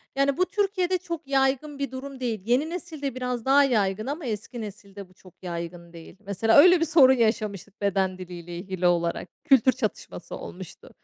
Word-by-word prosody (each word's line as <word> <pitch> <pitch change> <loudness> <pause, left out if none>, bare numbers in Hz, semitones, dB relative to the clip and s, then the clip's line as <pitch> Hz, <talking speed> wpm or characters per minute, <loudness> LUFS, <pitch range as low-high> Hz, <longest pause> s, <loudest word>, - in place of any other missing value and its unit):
yani 275 +2 +1
bu 365 - +3
Türkiye'de 375 -3 0
çok 335 -4 -7
yaygın 275 +1 0
bir 275 -2 -3
durum 265 +1 -8
değil. 230 -5 -2
Yeni 255 +7 +1
nesilde 315 -7 -5
biraz 250 -2 -3
daha 280 +2 +5
yaygın 215 -4 0
ama 295 +2 -4
eski 225 +1 -5
nesilde 200 -2 -10
bu - - -22
çok 185 -1 -18
yaygın 170 0 -6
değil. 165 +2 -13
Mesela 210 +5 +2
öyle 355 +3 +8
bir 330 - +2
sorun 280 -5 +6
yaşamıştık 215 -4 -1
beden 190 -2 0
diliyle 175 -1 -8
ilgili 185 -1 -2
olarak, 170 -1 0
kültür 265 -4 +5
çatışması - - -5
olmuştu. - - -10
240 Hz, 175 wpm, -25 LUFS, 190-280 Hz, -, öyle